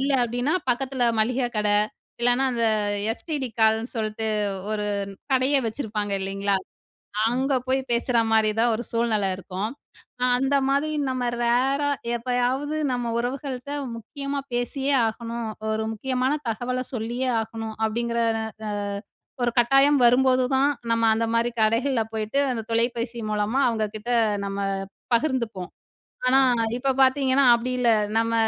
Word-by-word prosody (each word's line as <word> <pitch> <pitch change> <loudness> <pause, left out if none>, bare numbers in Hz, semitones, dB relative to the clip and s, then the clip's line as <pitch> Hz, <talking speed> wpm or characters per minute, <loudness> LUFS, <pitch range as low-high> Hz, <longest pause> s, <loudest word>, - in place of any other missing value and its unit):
இல்ல 275 +1 +1
அப்பிடினா, 245 +7 -1 0.2
பக்கத்தில 260 0 -1 0.2
மளிகை 245 +3 +1
கட 210 0 +1 0.5
இல்லன்னா 245 +2 +3
அந்த 235 -1 0 0.5
எஸ்டிடி 270 +2 -3
கால்னு 220 +2 +3
சொல்ட்டு, 220 0 -2 0.4
ஒரு 210 -1 -1 0.5
கடையே 265 +2 +3
வச்சிருப்பாங்க 215 -3 -3
இல்லேங்களா? 195 +1 0 0.7
அங்க 260 +4 0
போய் 265 +1 +2
பேசுறமாரி 230 -2 +2
தான் 235 +1 +4
ஒரு 235 - -4
சூழ்நெல 230 -4 +1
இருக்கும். 195 +4 -4 0.5
ஆ - - +3
அந்தமாரி 275 +2 +1 0.2
நம்ம 250 -2 -1
ரேரா 265 +4 +2 0.3
எப்பயாவது 250 +5 -1 0.2
நம்ம 245 -2 -2
உறவுகள்கிட்ட 260 +2 -4 0.2
முக்கியமா 275 +5 -5
பேசியே 270 +3 0
ஆகணும். 230 +1 -4 0.2
ஒரு 220 0 -1
முக்கியமான 255 +4 0 0.2
தகவல 250 +3 -2
சொல்லியே 240 +3 -2
ஆகணும். 220 0 -6
அப்பிடிங்கிற 235 +1 0 0.2
ற - - -2 0.3
அ - - -2 0.7
ஒரு 240 - +2
கட்டாயம் 275 +4 +5
வரும்போதுதான் 260 +2 +4 0.2
நம்ம 230 0 +1
அந்தமாரி 230 +1 +1
கடைகள்ல 230 +3 +2
போயிட்டு, 220 +5 -1
அந்த 225 -2 -3
தொலைபேசி 235 0 -1
மூலமா 210 +6 0
அவுங்ககிட்ட 215 0 -3 0.4
நம்ம 195 0 -4 0.6
பகிர்ந்துப்போம். 235 -9 -1 0.6
ஆனா 260 +1 +5 0.4
இப்ப 265 +2 0
பார்த்தீங்கன்னா 265 0 +3
அப்பிடி 235 +2 0
இல்ல. 240 - +3 0.3
நம்ம 230 0 +1
240 Hz, 120 wpm, -24 LUFS, 225-265 Hz, 0.7 s, கட்டாயம்